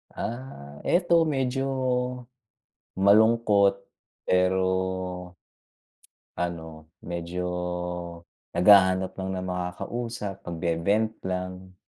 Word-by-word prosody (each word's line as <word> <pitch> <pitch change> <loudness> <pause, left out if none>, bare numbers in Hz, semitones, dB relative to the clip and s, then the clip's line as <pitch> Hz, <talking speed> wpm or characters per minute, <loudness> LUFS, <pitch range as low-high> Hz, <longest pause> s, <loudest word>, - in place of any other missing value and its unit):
Ah, 90 - -6
ito 170 -2 +3
medyo 135 -2 0 1.3
malungkot. 100 0 +5 0.5
Pero 95 0 +3 1.7
ano, 80 -2 -5
medyo 85 +1 -4 1.1
naghahanap 95 0 +5
lang 95 0 -3
ng 90 - -4
makakausap, 95 +3 -4
magbe-vent 85 +6 0
lang. 90 0 -4
95 Hz, 65 wpm, -26 LUFS, 90-110 Hz, 1.7 s, malungkot